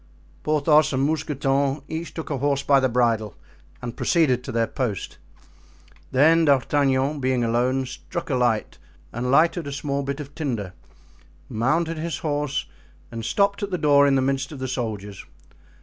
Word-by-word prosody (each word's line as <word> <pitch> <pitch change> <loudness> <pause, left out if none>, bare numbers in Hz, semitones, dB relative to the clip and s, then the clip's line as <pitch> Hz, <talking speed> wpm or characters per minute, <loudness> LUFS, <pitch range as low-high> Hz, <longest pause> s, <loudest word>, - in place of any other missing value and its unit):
Porthos 150 0 +3
and 135 +1 +1
Mousqueton 140 -2 0
each 160 0 -5
took 160 -1 -6
a 140 - -1
horse 140 0 0
by 140 0 +4
the 130 -1 +1
bridle 115 -3 +1 0.5
and 120 -1 -5
proceeded 135 -8 +2
to 130 - -6
their 115 -1 +1
post. 115 -5 -4 0.9
Then 160 +5 +5
D'Artagnan, 140 0 +2
being 130 -2 +1
alone, 125 +3 +1
struck 170 +5 -6
a - - +2
light 120 -3 0 0.3
and 120 +2 -2
lighted 165 +3 +3
a - - -4
small 140 0 -2
bit 140 +1 -4
of 145 -1 -8
tinder, 115 - -3 0.8
mounted 155 +8 0
his 165 +1 -3
horse 145 -1 -1 0.5
and 115 -1 -5
stopped 200 - +1
at 205 - -2
the 180 - -1
door 145 -2 +5
in 140 - +3
the 130 - +2
midst 135 +2 -1
of 150 - -7
the 130 0 -4
soldiers. 105 -6 -4
140 Hz, 165 wpm, -23 LUFS, 125-150 Hz, 0.9 s, Then